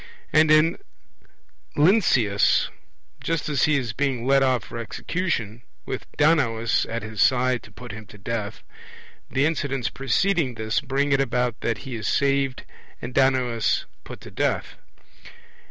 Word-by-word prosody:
And 155 0 +5
in 155 +2 +4 1.0
Lynceus: 145 - +3 0.5
just 165 -2 -1
as 140 -4 +2
he 150 -1 +2
is 120 -5 -3
being 130 -1 -1
led 135 +1 +4
off 130 -4 +2
for 115 - -8
execution, 115 - -3 0.2
with - - -6
Danaus 130 -8 +2
at 115 0 -4
his 110 -2 -4
side 125 -1 +3
to - - -15
put 125 -2 -10
him 105 +1 -10
to 105 - -14
death, 105 0 -5 0.7
the 135 +3 +1
incidents 140 -5 -1
preceding 140 0 0
this 110 0 -1
bring 140 +1 -1
it 135 0 +3
about 125 -2 -1
that 115 -4 -3
he 135 - -6
is 110 -3 -4
saved 135 -2 0 0.3
and 125 - -7
Danaus 130 -4 +2 0.2
put - - -10
to - - -11
death. - - -1
130 Hz, 145 wpm, -24 LUFS, 115-145 Hz, 1.0 s, And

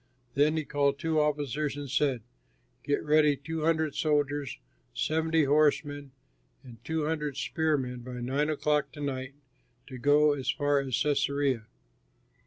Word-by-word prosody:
Then 150 +3 +3
he 155 - -2
called 140 -1 +1
two 160 +1 0
officers 150 -1 -1
and 145 -1 -5
said, 130 -3 0 0.6
"Get 145 - 0
ready 150 -1 +4
two 160 +2 -4
hundred 160 -2 +1
soldiers, 145 -3 0 0.4
seventy 160 0 +1
horsemen, 145 0 +1 0.5
and 120 -3 -14
two 160 +1 -1
hundred 150 -3 -2
spearmen 140 -4 -1
by 125 0 -7
nine 135 +5 0
o'clock 150 -1 0
to 150 - -11
night 135 -1 -4 0.5
to 130 -3 -9
go 145 +3 +4
as 135 -2 -4
far 145 -1 +2
as 135 -2 -4
Cæsarea." 140 -3 +1
145 Hz, 140 wpm, -29 LUFS, 135-150 Hz, 0.6 s, ready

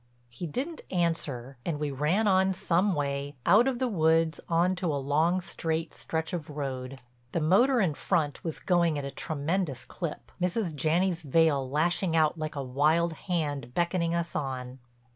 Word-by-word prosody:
He 120 +9 -6
didn't 280 - -4
answer 145 -8 -2
and 155 -4 -2
we 150 -1 -1
ran 155 +11 +1
on 190 0 +4
some 180 +2 +1
way, 140 0 -2
out 210 +8 +6
of 260 -2 0
the 255 +1 0
woods 165 -5 +2
on 175 +2 +3
to 180 -1 -2
a - - -1
long 155 +7 +1
straight 165 -2 -3
stretch 160 +2 -3
of 165 -4 -4
road. 135 -2 -5 0.3
The - - +1
motor 235 - +4
in 180 -8 +2
front 155 -2 -1
was 165 -2 -4
going 170 -4 +2
at 140 - -3
a 140 - -4
tremendous 155 0 -2
clip, 170 -5 -6
Mrs. 180 -1 0
Janney's 165 +5 +1
veil 145 -3 +2
lashing 165 +4 +1
out 155 -1 +3
like 155 -2 -4
a 140 - -3
wild 155 +6 +2
hand 145 -8 -3
beckoning 170 -1 +1
us 170 0 -2
on. 130 -2 -4
160 Hz, 170 wpm, -28 LUFS, 145-180 Hz, 0.3 s, out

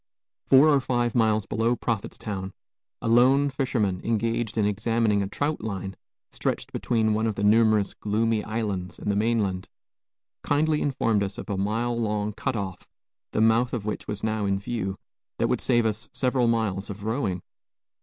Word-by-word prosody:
Four 135 +4 +7
or 140 -2 +4
five 120 -2 0
miles 110 -3 +2
below 115 +4 +1
Prophetstown, 100 -4 -4 0.5
a - - -1
lone 130 +5 +4
fisherman, 115 -9 -1
engaged 115 0 -1
in 105 - +3
examining 105 0 +1
a 100 - -1
"traut 145 +9 -2
line" 95 -3 -4 0.4
stretched - - -3
between 110 -2 +1
one 110 +1 +1
of 110 - -1
the 100 - -3
numerous 110 -1 +4
gloomy 110 +1 0
islands 105 -5 -3
and 105 - -2
the - - 0
mainland, 105 -4 0 0.7
kindly 150 +1 +1
informed 115 -6 +1
us 100 0 -3
of - - -6
a - - 0
mile 110 +5 -1
long 105 -2 -1
cut 130 +4 -2
off, 95 -4 -5 0.4
the - - 0
mouth 115 +2 +3
of 115 -5 -3
which 105 - -4
was 105 -1 -5
now 110 -2 0
in 100 0 +1
view, 100 -2 -3 0.4
that - - +1
would - - 0
save 120 -2 +2
us 110 +1 -2
several 125 -2 +1
miles 110 -4 0
of 100 0 -7
rowing. 105 -5 -2
110 Hz, 170 wpm, -26 LUFS, 100-120 Hz, 0.7 s, Four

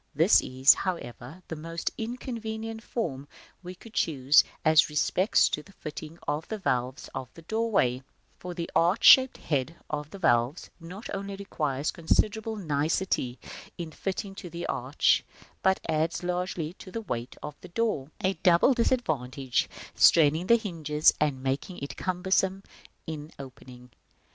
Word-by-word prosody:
This 165 +8 +5
is, 130 +2 +5
however, 165 -2 -5
the 160 - -5
most 165 +2 -4
inconvenient 225 -1 -5
form 145 - -4 0.3
we 180 0 -8
could 225 +4 -15
choose, 145 - +4 0.2
as 155 -1 +5
respects 180 +7 +3
the 150 +6 -4
fitting 155 0 -8
of 150 +2 -2
the 220 - -4
valves 130 -9 -2
of 130 -1 -6
the 165 - -13
doorway; 205 - +1 0.4
for 180 -1 -7
the 170 -1 -3
arch 175 +6 +3
shaped 260 -1 +8
head 145 +2 -2 0.2
of 150 -1 -3
the 200 - -9
valves 120 -3 +1
not 180 +6 -9
only 195 0 -4
requires 150 -8 -2
considerable 220 +6 0
nicety 150 - -1 0.4
in 170 -2 -6
fitting 195 +4 -4
to 195 -2 -9
the 170 +1 -6
arch, - - +1 0.4
but 190 0 +3
adds 160 +3 0
largely 180 -2 -2
to - - -10
the 230 - -4
weight 120 - -5
of 150 - -5
the - - -10
door, 175 -9 -1
a 190 +1 +2
double 175 +9 +5
disadvantage, 145 - 0 0.2
straining 160 +2 +5
the 235 - +6
hinges 160 -8 +2
and 140 -4 0
making 135 +7 -2
it 140 - -6
cumbersome 190 +1 0 0.4
in 155 -1 -6
opening. 125 -2 -12
165 Hz, 145 wpm, -28 LUFS, 145-195 Hz, 0.4 s, shaped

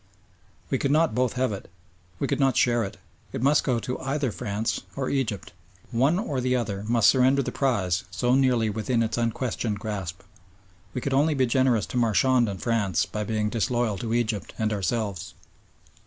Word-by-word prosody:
We - - +1
could 140 - 0
not 155 -1 +3
both 125 +1 +1
have 130 -2 0
it. 100 - -8 0.5
We - - -1
could - - -1
not 135 -2 +3
share 120 -1 +3
it. 100 - -6 0.4
It 115 - -3
must 145 +3 +4
go 125 -4 +1
to 125 - -4
either 135 -1 -1
France 110 -1 -2
or 135 -2 -2
Egypt. 115 -9 -2 0.4
One 135 +8 +2
or 145 - -2
the 125 0 +1
other 105 -5 -2
must 115 -2 +4
surrender 135 +1 +4
the - - -3
prize 100 -9 0
so 125 0 0
nearly 130 -4 +3
within 115 +3 0
its 115 +1 -2
unquestioned 115 -2 -1
grasp. 100 -5 -5 0.7
We 125 - -2
could 135 - -2
only 150 +3 +3
be 130 -1 +3
generous 125 -4 +2
to - - -5
Marchand 120 +1 +3
and 95 -2 -5
France 105 -8 +1
by 105 - -4
being 105 0 -1
disloyal 115 -3 0
to 115 -1 -2
Egypt 110 -7 -2
and 110 -1 0
ourselves. 100 -3 -2
120 Hz, 185 wpm, -26 LUFS, 105-130 Hz, 0.7 s, must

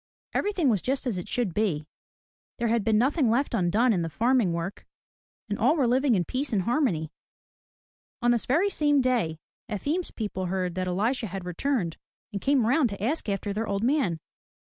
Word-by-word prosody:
Everything 390 -7 +1
was 210 -7 +3
just 270 +2 -1
as 220 -8 -1
it 175 - -7
should 235 -8 -1
be. 170 -7 0 0.7
There 235 -1 0
had 230 -1 +2
been 220 0 +3
nothing 265 +2 +2
left 255 +5 +1
undone 215 +7 +3
in 180 - 0
the 165 - -2
farm 240 - +2
work 170 +3 -4 0.6
and 205 -1 -3
all 260 +8 +4
were 285 -6 +2
living 255 +1 +3
in 175 -3 +1
peace 270 - -2
and 200 -4 +1
harmony. 220 - 0 1.1
On 240 -2 +3
this 240 -2 0
very 340 +10 +2
same 295 -4 +2
day 240 -11 +1 0.3
Efim*s 290 - -2
people 195 -4 -4
heard 180 -1 -1
that 185 +1 -2
Elisha 220 +7 0
had 190 -1 -6
returned, 180 - -1 0.4
and 200 - -3
came 275 -4 +3
round 255 +2 +3
to 200 -1 -6
ask 260 -1 -1
after 200 0 -2
their 220 +2 -2
old 200 +1 -1
man. 245 - +1
225 Hz, 190 wpm, -27 LUFS, 190-265 Hz, 1.1 s, all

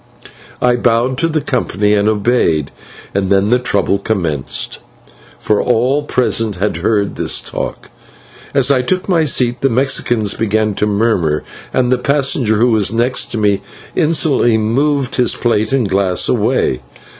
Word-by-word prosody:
I 125 0 +3
bowed 120 +2 +1
to 165 - +2
the 155 -2 -1
company 105 -6 0
and 105 0 +2
obeyed, 105 - 0 0.4
and 95 -1 -1
then 100 +2 +2
the 125 - +4
trouble 100 -4 0
commenced, 85 -10 -3 0.6
for 105 - 0
all 125 +4 +1
present 115 -6 0
had 95 -2 -2
heard 100 +3 0
this - - +1
talk. - - -6 0.6
As 135 0 +3
I 130 -2 +3
took 185 +8 -1
my 170 -4 +2
seat 125 -4 +1
the 135 - +2
Mexicans 120 -4 +1
began 110 -1 0
to 105 - -1
murmur, 100 -8 0 0.3
and 125 -1 0
the 130 - +2
passenger 135 -4 +1
who 120 +3 +2
was 110 -3 +2
next 120 +3 +1
to - - -2
me 100 -2 +1 0.3
insolently 150 -8 +2
moved 135 +5 0
his 125 -2 +2
plate 110 -2 0
and 130 -5 +1
glass 95 -1 +1
away. 65 - 0
115 Hz, 155 wpm, -15 LUFS, 105-130 Hz, 0.6 s, the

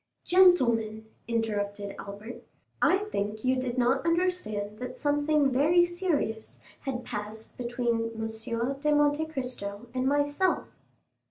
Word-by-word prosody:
"Gentlemen," 235 - +4 0.2
interrupted 205 -3 -2
Albert, 205 +4 -8 0.4
"I 375 - +5
think 210 +3 -2
you 255 0 +3
did 255 -1 -2
not 255 +2 +2
understand 335 - -1
that 250 0 -6
something 290 -1 +2
very 320 +7 +4
serious 345 - -2 0.2
had 255 -3 -4
passed 210 +1 -6
between 235 -2 -1
M. 230 +4 -3
de 300 +1 +2
Monte 295 +1 +3
Cristo 250 -7 -5
and 255 0 0
myself." 290 +6 +1
250 Hz, 115 wpm, -28 LUFS, 220-290 Hz, 0.4 s, I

